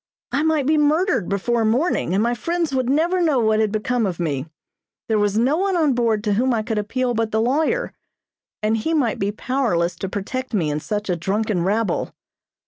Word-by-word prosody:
I 280 - +1
might 315 -3 +1
be 305 +2 +3
murdered 310 - +2
before 225 +4 0
morning, 225 - +1
and 205 - +2
my 235 +1 +1
friends 335 +4 -2
would 255 -2 0
never 335 +6 +2
know 310 -5 +2
what 220 -1 +2
had 215 -2 +1
become 225 +1 0
of 180 -2 -4
me. 150 -4 -2 0.6
There 220 -2 +1
was 205 0 +1
no 260 +7 +2
one 385 0 +1
on 305 -5 +3
board 230 -3 +1
to 210 -2 +1
whom 245 +4 +2
I 220 - -1
could 220 -1 -1
appeal 245 +4 -1
but 225 -1 0
the 220 - +1
lawyer, 310 - 0 0.7
and 215 +1 +2
he 320 +9 -1
might 250 -8 0
be 195 +1 0
powerless 210 -8 -1
to 190 - -4
protect 255 +6 -4
me 160 -7 +1
in 150 - -1
such 210 +6 -3
a 180 - 0
drunken 195 +1 -1
rabble. 205 0 -1
230 Hz, 210 wpm, -21 LUFS, 205-275 Hz, 0.7 s, be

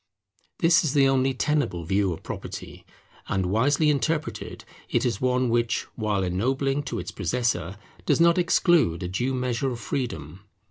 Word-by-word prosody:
This 165 +1 +4
is 150 -4 -1
the 140 -1 +5
only 135 0 +2
tenable 125 - 0
view 95 +3 +1
of 85 - -7
property; - - -8 0.4
and 95 -1 0
wisely 145 - +2
interpreted, 155 +2 -2 0.2
it - - +1
is 120 - -1
one 125 0 +2
which, 120 0 0
while 105 -3 -1
ennobling 135 +10 0
to - - -4
its - - -5
possessor, 115 -7 -1 0.3
does - - +3
not 170 +1 +5
exclude 170 - +3
a - - -2
due 125 +9 -1
measure 125 +1 -1
of 120 -2 -5
freedom. 90 - -4
125 Hz, 155 wpm, -25 LUFS, 100-140 Hz, 0.4 s, the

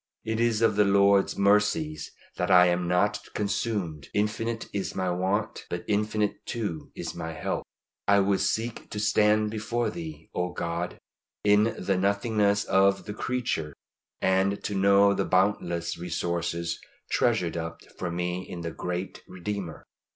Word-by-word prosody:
It 110 0 -1
is 115 -1 +2
of 110 -2 +3
the 105 - +6
Lord's 100 0 +4
mercies 100 -7 +2 0.3
that - - -1
I 90 0 +8
am 90 0 +1
not 105 +4 +2 0.2
consumed! 100 -8 -2
Infinite 115 +2 -1
is 100 -1 -3
my 95 -1 0
want, 95 +5 -1
but 85 - -4
infinite 105 0 0
too 105 -10 -4
is - - -5
my 80 0 -5
help. - - -3 0.4
I 100 0 +6
would 100 0 +2
seek 115 +1 -2
to 105 - -4
stand 105 0 +3
before 115 +2 -1
Thee, 165 -2 -8
O 90 0 -2
God, 85 +1 -3 0.5
in 105 +2 +4
the 95 +1 0
nothingness 100 +1 +2
of 100 0 +3
the 105 - -5
creature, 110 - -2 0.4
and 95 +1 +1
to 105 - -2
know 100 +1 +5
the - - 0
boundless 90 -3 +1
resources 85 -1 -2 0.3
treasured 105 -9 +1
up 80 0 -5 0.2
for 90 - -2
me 90 +1 -2
in 85 - -6
the 85 -1 -4
great 90 +3 -4
Redeemer. 95 -2 -5
100 Hz, 150 wpm, -27 LUFS, 90-105 Hz, 0.5 s, I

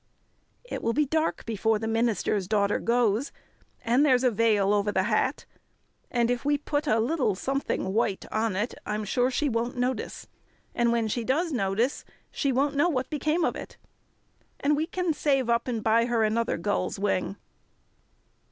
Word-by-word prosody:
"It - - -6
will 230 - 0
be 300 +3 +2
dark 315 +3 -1
before 220 0 +1
the 225 +1 -4
minister's 225 -4 0
daughter 205 -1 +1
goes, 235 +1 +1 0.5
and 240 +5 +3
there's 260 -4 +4
a 250 - +4
veil 210 -2 +2
over 205 0 +1
the 190 -2 +1
hat, 235 +6 0 0.6
and 240 -1 +1
if 245 - -2
we 290 0 +2
put 290 +1 -2
a 225 -3 +3
little 250 - +1
something 265 -4 -2
white 210 -3 0
on 220 -2 0
it 210 +5 -1
I'm 210 0 -3
sure 245 +5 +1
she 290 +3 0
won't 240 0 -2
notice. 250 +1 -2 0.5
And 235 -1 +2
when 230 -1 +1
she 230 +2 -2
does 315 +8 0
notice 225 +2 0 0.3
she 280 - 0
won't 275 +3 +1
know 310 +5 +3
what 260 -3 -2
became 310 +3 +1
of - - -1
it. - - -9 0.8
And 295 +1 +2
we 310 +2 -1
can 360 -2 -1
save 270 -4 +1
up 235 +1 +1
and 230 -4 -2
buy 230 +1 +3
her 235 -2 +1
another 225 +2 0
gull's 185 +1 -1
wing." 195 -1 -1
235 Hz, 175 wpm, -27 LUFS, 215-275 Hz, 0.8 s, there's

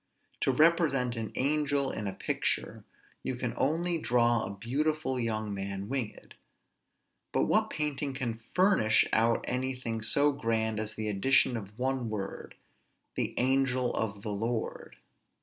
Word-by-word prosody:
To - - +1
represent 145 -4 +3
an 115 -2 -4
angel 145 0 +1
in 105 - -4
a 95 - -3
picture, - - -1 0.4
you 130 - -3
can 120 -1 -3
only 165 +5 0
draw 120 -4 +2
a - - -4
beautiful 135 +3 -1
young 110 -3 -1
man 100 +1 -4
winged: 130 -5 -4 1.0
but - - +2
what - - +2
painting 145 -2 -2
can 120 -4 -3
furnish 185 - +4
out 115 +1 +3
anything 125 -3 -2
so 145 +6 +4
grand 110 -4 -1
as 110 0 -4
the 110 0 -3
addition 120 +5 +3
of 105 -1 -7
one 130 -2 -1
word, 100 -2 -5 0.6
"the - - -2
angel 130 -1 +2
of 100 -2 -2
the 105 - -3
Lord"? 110 +3 -3
125 Hz, 140 wpm, -30 LUFS, 110-135 Hz, 1.0 s, furnish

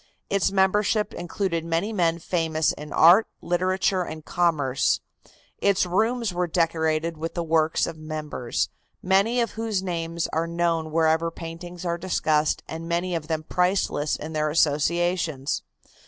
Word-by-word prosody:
Its 200 -1 +2
membership 205 +2 +2
included 175 -1 -2
many 170 +6 -1
men 170 -4 +2
famous 160 -2 0
in 150 0 -9
art, 180 +7 +6
literature 185 +1 +1
and 155 -3 -6
commerce. 150 -7 +1 0.6
Its 200 -2 +3
rooms 220 +4 0
were 180 0 0
decorated 160 -1 0
with 165 +2 -5
the 170 - -1
works 160 -1 +2
of 165 -2 -7
members, 155 -5 -3 0.3
many 200 +6 +3
of 235 -2 0
whose 220 -4 -2
names 170 -2 -2
are 165 +1 0
known 170 -1 0
wherever 160 +1 +2
paintings 170 +2 -8
are 170 0 -1
discussed 155 -4 +1
and 165 +1 -6
many 175 +2 0
of 160 -3 -3
them 160 -1 -2
priceless 180 -4 0
in 160 +2 -7
their 155 0 0
associations. 160 -1 +1
170 Hz, 140 wpm, -25 LUFS, 160-185 Hz, 0.6 s, art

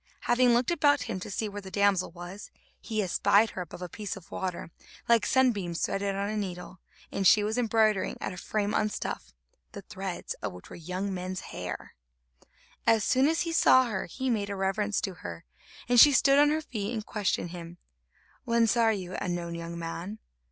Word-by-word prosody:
Having 240 0 +4
looked 245 +6 +1
about 290 -4 +3
him 185 - -4
to - - -7
see 215 +2 -2
where 205 0 -6
the 190 - -9
damsel 200 -2 +2
was, 175 +4 -9 0.3
he 215 -2 -2
espied 200 +4 +3
her 185 - -5
above 180 0 -8
a - - -4
piece 205 +3 -5
of 185 - -15
water, 180 -3 -4 0.4
like 230 -3 +4
sunbeams 205 -10 +2
threaded 195 0 -2
on 200 +1 -1
a 215 - -3
needle, 185 -3 -5 0.3
and 195 -1 +2
she 210 +2 +6
was 215 +1 -1
embroidering 220 -4 +2
at - - -4
a - - -9
frame 210 +2 -2
on 215 - +1
stuff, - - -5 0.4
the 200 - -8
threads 190 -1 -5
of 105 -3 -3
which 90 - -13
were - - -7
young 185 +4 -4
men's 185 0 -4
hair. - - -6 0.9
As 225 -2 +4
soon 260 +5 +3
as 325 +1 +1
he 335 - -1
saw 260 -5 +6
her, 190 -4 -3
he 260 +8 -2
made 205 -3 -1
a 200 - -3
reverence 195 +2 0
to 195 - -3
her, 85 -3 -7 0.4
and 245 0 +5
she 290 +4 +9
stood 275 +1 +5
on 290 0 +6
her 310 +1 0
feet 220 -5 -4
and 215 -1 -4
questioned 195 -4 -1
him: 170 -1 -9 0.7
"Whence 230 -1 +2
are 230 -2 +4
you, 185 -3 -4
unknown 175 -2 -3
young 170 0 -6
man?" 170 +5 -5
200 Hz, 200 wpm, -28 LUFS, 180-230 Hz, 0.9 s, she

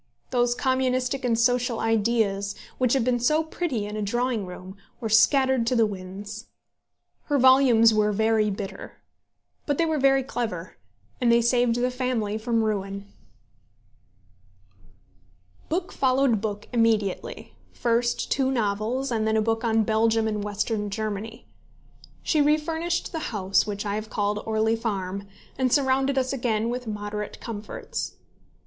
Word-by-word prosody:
Those 240 -1 +2
communistic 260 0 0
and 235 -2 +1
social 245 0 +2
ideas, 215 -3 +1 0.2
which 250 -2 +2
had 265 -3 +2
been 245 0 +1
so 305 +7 +2
pretty 315 -9 -3
in 210 +1 -6
a 215 - -3
drawing 235 0 -1
room, 185 +1 -9 0.2
were 225 -3 -3
scattered 260 +2 +4
to 250 - +2
the 230 -2 +4
winds. 205 +2 -7 0.8
Her 290 - +1
volumes 255 -4 +6
were 210 -1 +2
very 220 0 +2
bitter; 195 -1 -6 0.7
but 285 -2 0
they 335 - +2
were 315 -2 0
very 270 0 +4
clever, 220 -9 -4 0.5
and 240 -1 +4
they 235 - +5
saved 235 0 +2
the 250 +1 0
family 245 -5 -2
from 230 0 0
ruin. 200 -1 -3 2.6
Book 345 +3 -2
followed 260 -4 +2
book 210 -1 -4
immediately, 225 -5 0 0.2
first 240 0 0
two 265 -1 +2
novels, 235 +2 -1
and 220 -2 0
then 220 0 +2
a - - +4
book 225 +1 0
on 225 -1 +2
Belgium 220 +1 +2
and 210 -1 -2
Western 210 +1 -2
Germany. 215 +1 -5 0.8
She 310 - +2
refurnished 320 +3 0
the 325 - -3
house 195 -3 +1
which 205 0 -4
I 200 - -1
have 215 +1 -4
called 205 0 -1
Orley 220 0 +1
Farm, 200 -3 -3 0.3
and 255 -1 +2
surrounded 270 0 +2
us 260 0 +1
again 230 -3 0
with 250 -1 -5
moderate 210 0 -5
comforts. 215 -2 -6
230 Hz, 145 wpm, -25 LUFS, 210-255 Hz, 2.6 s, volumes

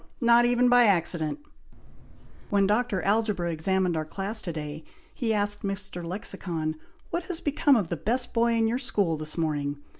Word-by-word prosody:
not 235 0 +5
even 245 +1 +3
by 245 0 +6
accident! 170 - +1 1.1
When 200 -1 +3
Dr. 210 -1 0
Algebra 200 -4 +1
examined 180 +2 0
our 155 - -1
class 195 +7 -2
to 175 - -4
day, 155 0 -6 0.3
he 235 -3 -1
asked 205 -1 0
Mr. 195 -3 -4
Lexicon, 170 -3 -3 0.4
'What 340 0 -2
has 355 -3 -5
become 290 -2 +3
of 200 -8 0
the 170 - -2
best 240 - -1
boy 235 0 +2
in 225 -1 +2
your 240 +3 0
school 200 - 0
this 155 +1 -5
morning?' 145 -3 -1
200 Hz, 170 wpm, -27 LUFS, 165-235 Hz, 1.1 s, by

